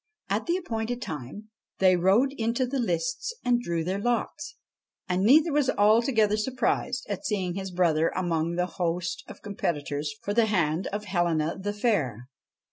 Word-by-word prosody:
At 210 +2 0
the 345 +1 +2
appointed 240 -7 -3
time 160 - -7 0.3
they 185 -1 +5
rode 200 +10 +3
into 230 +3 +1
the 265 +2 -2
lists - - -1
and 240 -1 +3
drew 170 -7 -2
their 185 +4 -2
lots, 240 +6 -2 0.5
and 180 0 0
neither 300 - +5
was 285 -2 +2
altogether 215 0 +3
surprised 250 +2 -1
at 200 -3 -4
seeing 190 -4 -1
his 190 +1 -4
brother 165 -3 +2
among 170 -2 0
the 180 0 +1
host 175 -1 -2
of - - -12
competitors 145 -7 -3
for 205 - -2
the 230 0 +3
hand 170 -4 +1
of 210 +1 -4
Helena 170 -4 0
the 200 +2 -3
Fair. 165 - 0
200 Hz, 160 wpm, -27 LUFS, 175-240 Hz, 0.5 s, they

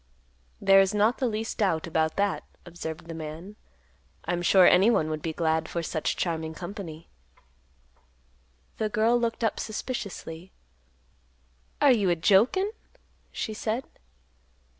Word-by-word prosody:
"There 195 0 +6
is 195 +2 +3
not 215 +4 +2
the 260 - +1
least 220 0 -4
doubt 175 -7 +1
about 160 -1 0
that," 200 0 0 0.2
observed 170 -1 -7
the 165 - -6
man; 160 +5 -8 0.7
"I'm 175 0 -1
sure 185 +1 +6
anyone 180 -5 +4
would 155 -1 -3
be 160 - -2
glad 160 0 0
for 170 - -3
such 155 -1 -2
charming 160 -2 -2
company." 175 -3 -8 1.7
The 215 - 0
girl 220 +3 +2
looked 235 0 -2
up 225 - 0
suspiciously; 200 -6 -6 1.3
"Are 290 -2 +6
you 205 -6 +3
a 175 - +3
jokin'?" 230 - +3 0.6
she 220 - -4
said. 225 +3 -2
190 Hz, 130 wpm, -27 LUFS, 160-215 Hz, 1.7 s, There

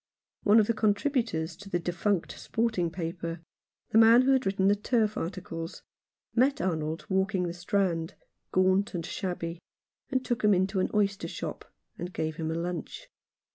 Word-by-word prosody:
One 210 +2 +6
of 215 - +4
the 230 - +1
contributors 210 - 0
to 200 +1 -11
the 175 - +1
defunct 175 +2 -1
sporting 220 -7 0
paper, 165 -1 -4 0.5
the 220 - +6
man 230 +2 +8
who 270 - +3
had 265 -4 +3
written 195 0 +2
the 200 - +5
turf 215 0 +1
articles, 165 -2 -5 0.5
met 270 +4 +3
Arnold 160 -1 -2
walking 190 0 +1
the 170 -1 -2
Strand, 175 -2 -1 0.4
gaunt 185 +1 +2
and 170 -2 -3
shabby, 175 -3 -4 0.5
and 260 -2 0
took 240 -2 -1
him 210 -2 +5
into 190 +2 +1
an - - +1
oyster 200 -1 +1
shop, - - -6 0.3
and 180 +1 -5
gave 160 0 -2
him 160 -1 -2
a 160 - -1
lunch. 175 - -5
190 Hz, 165 wpm, -29 LUFS, 170-215 Hz, 0.5 s, man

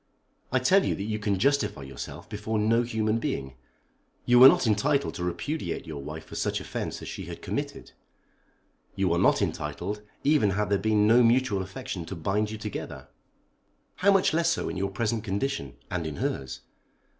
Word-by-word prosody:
I 130 - +3
tell 185 +10 +4
you - - 0
that 95 - -4
you 110 +1 -2
can 100 -2 0
justify 140 - +1
yourself 65 -3 -8
before 105 +1 -3
no 110 +2 +3
human 110 -2 0
being. 65 -11 -3 0.7
You 120 0 +5
were 130 - +12
not 135 - +5
entitled 135 +7 +1
to 90 - -5
repudiate 145 - -3
your 75 -4 -6
wife 75 +3 -7
for - - -13
such - - -1
offence - - -5
as - - -7
she - - -6
had - - -9
committed, - - -4 1.0
you 95 -3 +1
are 85 - +1
not - - +4
entitled 90 +8 -3 0.2
even 145 -7 +4
had 105 -1 0
there 100 - +3
been 105 0 +2
no 115 +3 +6
mutual 120 -4 +3
affection 95 -1 -6
to 95 - -5
bind 100 +6 0
you 110 - -5
together. 105 -1 -6 0.9
How 200 +2 +4
much 195 -4 +3
less 165 +1 +2
so 170 - -1
in - - -5
your 100 +1 -1
present 110 +2 -1
condition, 100 - -2 0.2
and 85 -3 -2
in 75 - -5
hers. 65 -1 -3
105 Hz, 185 wpm, -27 LUFS, 90-120 Hz, 1.0 s, were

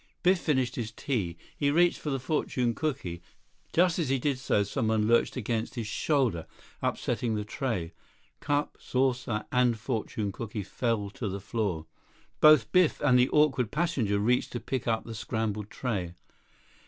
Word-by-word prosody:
Biff 185 0 +4
finished 130 -7 0
his 115 -3 -3
tea. 110 - -2 0.2
He 145 - +1
reached 170 +4 +3
for 150 - -4
the 135 -1 -1
fortune 125 -3 0
cooky. 100 - -3 0.5
Just 175 0 +3
as 155 -6 0
he 135 - +2
did 135 0 -1
so, 105 -6 +2
someone 110 0 0
lurched 115 +1 +3
against 115 0 -2
his 115 -3 -3
shoulder, 115 - 0 0.3
upsetting 115 -3 -1
the 105 -1 -2
tray. 105 - -3 0.5
Cup, 145 0 -1
saucer, 125 -4 0
and 125 -2 +3
fortune 110 -3 -3
cooky 105 0 -5
fell 105 -1 -1
to 105 0 -4
the 100 +1 -4
floor. 100 -6 -2 0.5
Both 155 -6 +6
Biff 180 -3 +4
and 130 -4 +5
the 125 - +4
awkward 135 -6 +3
passenger 140 -11 0
reached 120 +5 +1
to 120 - -2
pick 130 -1 -3
up 110 -1 +1
the 115 - -6
scrambled 110 -2 -3
tray. 95 -9 -3
120 Hz, 160 wpm, -29 LUFS, 105-135 Hz, 0.5 s, Both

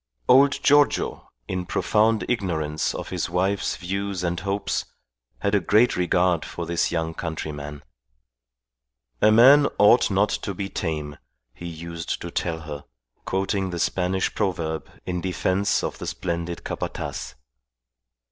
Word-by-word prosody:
Old 140 +2 +5
Giorgio, 145 0 +3 0.2
in 90 -1 -3
profound 110 +1 +2
ignorance 80 -10 -1
of - - -5
his - - -2
wife's 95 +3 0
views 95 +1 -3
and 85 0 -1
hopes, 100 +2 -2 0.6
had 100 - 0
a 105 - +5
great 105 +7 +3
regard 90 -1 +2
for - - -6
his 85 -1 0
young 80 -1 -1
countryman. 75 -3 -5 1.4
"A 110 - +6
man 135 +6 +7
ought 105 +4 +6
not 100 +1 +2
to 100 -1 -3
be 95 +1 -4
tame," 75 -4 -3 0.4
he 85 - -8
used 85 0 -5
to 85 - -7
tell 80 -2 -2
her, 75 -2 -7 0.4
quoting 95 0 -1
the 85 - -4
Spanish 90 +2 0
proverb 85 -6 -2 0.2
in 90 -1 -2
defence 95 +2 0
of - - -4
the - - -5
splendid 85 -1 -3
Capataz. - - -5
90 Hz, 135 wpm, -24 LUFS, 85-100 Hz, 1.4 s, man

